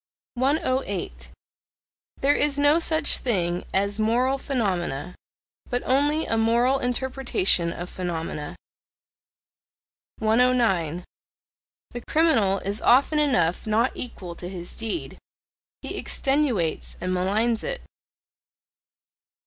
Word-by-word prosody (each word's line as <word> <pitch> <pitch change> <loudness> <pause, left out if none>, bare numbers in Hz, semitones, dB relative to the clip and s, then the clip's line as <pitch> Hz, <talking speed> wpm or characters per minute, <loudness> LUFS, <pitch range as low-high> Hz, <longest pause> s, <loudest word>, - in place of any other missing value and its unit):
108. 245 - -1 0.9
There 280 +2 +4
is 290 -1 +2
no 290 +3 +4
such 315 -2 +3
thing 175 -7 -1
as 200 +2 0
moral 250 +5 +1
phenomena, 180 - -2 0.6
but 245 0 -1
only 290 +4 +2
a 225 - -1
moral 235 +4 +2
interpretation 245 -9 0
of 175 +1 -6
phenomena. 165 -5 -5 1.6
109. 220 -8 +2 0.9
The 240 - -6
criminal 230 -12 +3
is 200 +2 -2
often 280 +5 +4
enough 180 - +1
not 225 +4 +2
equal 185 -8 -7
to 175 +1 -8
his 175 -2 -8
deed: 225 +9 -5 0.6
he - - -5
extenuates 270 - -1
and 185 +1 -2
maligns 215 +5 0
it. - - -4
225 Hz, 100 wpm, -24 LUFS, 180-270 Hz, 1.6 s, There